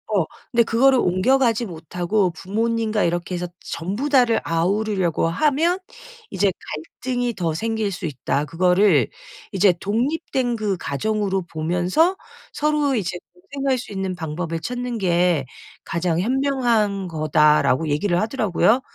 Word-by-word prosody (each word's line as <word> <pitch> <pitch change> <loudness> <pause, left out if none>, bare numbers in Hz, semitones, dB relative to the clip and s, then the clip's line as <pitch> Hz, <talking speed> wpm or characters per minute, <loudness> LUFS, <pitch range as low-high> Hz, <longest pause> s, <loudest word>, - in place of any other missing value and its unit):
어. 185 -5 +3 0.3
근데 235 -1 +4
그거를 255 +3 +4
옮겨가지 235 +6 +2
못하고 180 +3 -1
부모님과 220 +4 -1
이렇게 175 +1 -1
해서 175 0 -3
전부 205 - -4
다를 245 -5 +4
아우르려고 180 0 0
하면 305 - +1 0.5
이제 200 -1 +1 0.5
갈등이 245 -1 -1
더 170 -6 -2
생길 220 +2 -1
수 180 -1 -5
있다. 145 0 -2
그거를 180 - +3 0.5
이제 190 -1 +4
"독립된 245 +3 -1
그 210 -4 -1
가정으로 195 +5 -1
보면서 180 - +1 0.4
서로 300 -2 +1
이제 180 -5 -2 0.2
공생할 265 +9 -2
수 235 - -9
있는 190 -2 -3
방법을 165 0 -4
찾는 245 +5 -4
게 175 -5 +2 0.4
가장 170 -1 -1
현명한 235 -4 +1
거다."라고 155 -2 +3
얘기를 175 +5 +1
하더라고요. 220 0 +2
195 Hz, 295 characters per minute, -22 LUFS, 175-240 Hz, 0.5 s, 근데